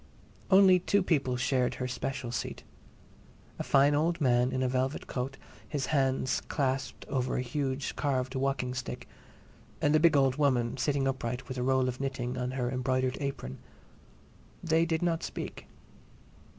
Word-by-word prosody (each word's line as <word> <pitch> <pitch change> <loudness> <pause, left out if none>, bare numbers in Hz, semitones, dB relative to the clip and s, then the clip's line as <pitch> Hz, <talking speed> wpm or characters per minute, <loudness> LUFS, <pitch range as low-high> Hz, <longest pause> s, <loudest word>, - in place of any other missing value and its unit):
Only 190 -1 +7
two 200 +2 +2
people 135 -8 +1
shared 125 0 +1
her 125 - -3
"special" 125 -1 -4
seat: 120 - -4 1.0
a - - -1
fine 140 +1 +4
old 165 +3 +1
man 125 -3 +3
in 130 0 0
a - - +2
velvet 130 +2 -1
coat, 135 +1 -4 0.3
his 145 -3 -1
hands 135 -2 +1
clasped 135 -2 -2
over 130 -2 -1
a 125 - 0
huge 135 0 -2
carved 130 -3 -1
walking 130 -2 -1
stick, 130 -1 -5 0.7
and 145 +1 +3
a - - +6
big 160 -2 +5
old 135 -1 +3
woman, 125 -5 +2
sitting 135 +1 0
upright, 125 -1 -3
with 130 -2 -5
a - - -1
roll 130 0 +2
of 125 0 -3
knitting 130 -2 -3
on 125 0 -2
her 125 -1 -1
embroidered 130 0 0
apron. 135 - -4 1.0
They 165 0 +2
did 160 0 0
not 165 -2 +1
speak. - - -6
135 Hz, 160 wpm, -30 LUFS, 125-145 Hz, 1.0 s, Only